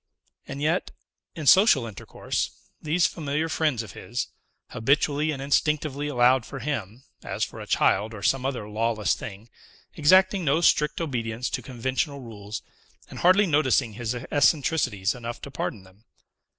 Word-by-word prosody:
And 140 +1 -5
yet, 165 +4 +1 0.5
in 155 - -6
social 190 - +6
intercourse, 110 -4 -4 0.3
these 165 +3 +2
familiar 155 0 -1
friends 150 -6 0
of 105 - -10
his 120 +2 -5 0.4
habitually 145 +5 +1
and 145 -3 -2
instinctively 145 +1 0
allowed 125 -2 +3
for 135 - -8
him, 125 -4 -4 0.2
as - - -3
for - - -5
a - - -8
child 105 +3 +2
or 100 - -9
some 135 +3 +2
other 130 -6 -3
lawless 110 0 0
thing, 105 +2 -8 0.5
exacting 185 +5 +4
no 150 +1 +2
strict 150 -3 +3
obedience 120 -5 -3
to - - -2
conventional 130 +3 -3
rules, 105 -3 -8 0.5
and - - -8
hardly 185 +4 +5
noticing 140 - +2
his 115 +2 -3
eccentricities 135 - +1
enough 120 -1 -6
to 140 - -8
pardon 105 -6 -4
them. 95 +3 -21
135 Hz, 150 wpm, -25 LUFS, 115-150 Hz, 0.5 s, social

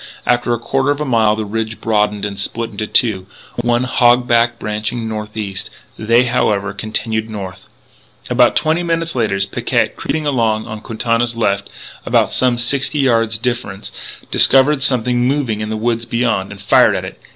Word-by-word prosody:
After 120 0 +1
a 120 - +1
quarter 130 +4 -1
of 145 0 0
a 150 - -2
mile 110 -5 +2
the 110 0 -3
ridge 110 +1 -4
broadened 105 -2 0
and 100 -1 -4
split 115 +3 -3
into 105 +1 -4
two, 100 -6 +2 0.3
one 120 +1 +1
hog 120 0 +3
back 120 0 +2
branching 105 +2 -3
northeast! 105 -2 -5 0.3
They, 115 +3 +3
however, 105 -5 0
continued 110 +1 -3
north. 95 -3 -8 0.6
About - - +3
twenty 160 +2 +1
minutes 165 -1 -1
later 110 -5 0
Picquet, 95 - 0
creeping 155 0 -3
along 115 -6 0
on 110 -2 -7
Quintana's 115 +1 -1
left, 100 -3 0 0.3
and - - +2
some 125 -2 +1
sixty 135 +5 +1
yards 115 -5 +2
distant, 120 -4 -4 0.4
discovered 135 +2 +5
something 125 -1 +2
moving 130 -6 -1
in 110 - -4
the 110 - -3
woods 115 +1 -1
beyond, 115 -6 -1
and 100 - -10
fired 100 - +4
at - - -3
it. - - -10
115 Hz, 165 wpm, -17 LUFS, 105-125 Hz, 0.6 s, discovered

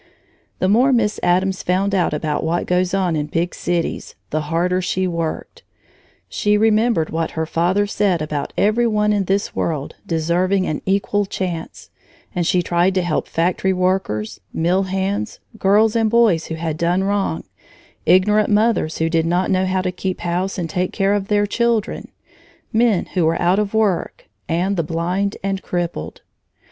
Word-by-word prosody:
The 185 - 0
more 240 +7 +4
Miss 220 -4 +1
Addams 185 +2 +1
found 190 +2 0
out 185 -3 +2
about 150 0 -2
what 165 +2 0
goes 180 0 +1
on 185 -4 +1
in 150 -1 -2
big 165 +3 -1
cities, 175 -1 -3 0.2
the 155 - 0
harder 170 +4 0
she 185 +1 -1
worked. 165 -3 -4 0.7
She 210 0 +1
remembered 220 -5 +2
what 165 0 -2
her 160 - 0
father 175 +5 +1
said 200 -3 +1
about 150 -2 -3
every 225 +4 +3
one 210 -1 +2
in 200 -2 0
this 195 +2 -1
world 150 -4 -2
deserving 180 +4 +1
an 155 - -3
equal 200 +1 +1
chance, 175 -4 -5 0.4
and 175 -2 -1
she 180 -1 +2
tried 175 +2 +1
to 185 - +2
help 175 -3 -1
factory 180 +3 0
workers, 180 - -1
mill 175 +4 +1
hands, 195 +3 -2 0.2
girls 210 +3 +3
and 225 -1 +2
boys 220 -8 +3
who 160 - -4
had 160 -1 -3
done 175 +3 +1
wrong, 200 0 -1 0.6
ignorant 210 +3 +4
mothers 210 -6 +2
who 160 - +1
did 165 0 +1
not 175 +2 +1
know 185 0 +2
how 185 0 0
to 185 - -1
keep 185 0 -4
house 180 +3 -2
and 175 -3 -2
take 180 +3 -2
care 195 -1 +1
of 200 -1 -1
their 205 -1 +2
children, 230 0 -1 0.7
men 225 -4 +3
who 180 - +1
were 165 +1 +1
out 180 +3 +3
of 210 0 -2
work, 210 -5 0 0.2
and 180 +4 0
the 170 - +1
blind 175 +5 -1
and 195 -1 -2
crippled. 170 - -4
185 Hz, 170 wpm, -20 LUFS, 170-205 Hz, 0.7 s, more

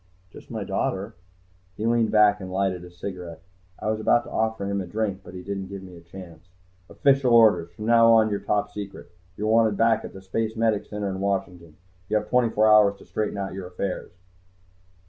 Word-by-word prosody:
"Just - - -14
my - - -4
daughter." 100 +4 -2 0.6
He 110 - -3
leaned 115 -1 +2
back 105 -1 +4
and 95 -1 -7
lighted 95 -2 -1
a 90 - -10
cigarette. 90 -2 -8 0.3
I 110 - -2
was 110 - -2
about 120 +2 +3
to - - -12
offer 110 -2 -1
him 100 0 -1
a 90 - -7
drink, 100 0 -2
but - - -12
he 90 - -8
didn't 95 0 -5
give 100 0 -8
me 90 -1 -12
a 85 - -13
chance. 85 -1 -13 0.4
"Official 135 -2 +2
orders. 100 -7 +5
From 105 - -7
now 115 0 +6
on, 110 -1 +4
you're 100 - -1
Top 105 0 -1
Secret. 100 -1 -8 0.3
You're 105 - -3
wanted 110 -1 +3
back 115 -1 +3
at - - -7
the 95 - -9
Spacemedic 110 +1 -1
Center 105 -1 -4
in 95 - -5
Washington. 90 -5 -3 0.3
You 110 - +2
have 105 0 -4
twenty 125 -2 +3
four 110 0 +2
hours 105 -2 +5
to - - -16
straighten 105 -1 -3
out 95 -1 -4
your 95 -1 -6
affairs." 90 0 -5
100 Hz, 205 wpm, -25 LUFS, 95-110 Hz, 0.6 s, now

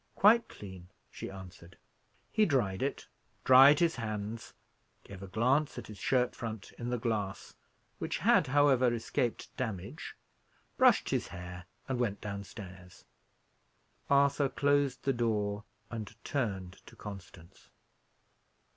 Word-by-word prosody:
"Quite 225 +3 +5
clean," 95 -3 -11 0.2
she - - -7
answered. 95 -2 -11 0.5
He 215 - +3
dried 105 - +1
it, - - -2 0.4
dried 135 +3 +8
his 165 -2 +2
hands, 110 -1 -5 0.5
gave 95 -1 -11
a 100 - -7
glance 130 +9 +1
at - - -6
his 105 -2 -10
shirt 125 +2 +1
front 110 -3 -6
in 120 0 -3
the 125 - 0
glass, 110 -4 -3 0.5
which - - -2
had, - - +4
however, 130 -3 +4
escaped 120 0 -2
damage, 100 -7 -5 0.6
brushed - - +4
his - - 0
hair, 90 0 -8 0.2
and 130 -2 -2
went 105 -5 0
downstairs. 100 -3 -9 1.0
Arthur 140 0 +4
closed 140 -2 +1
the 135 - +2
door 105 -3 -1 0.3
and 110 -3 -6
turned 95 -9 -3
to - - -13
Constance. 95 -3 -11
110 Hz, 125 wpm, -31 LUFS, 95-130 Hz, 1.0 s, dried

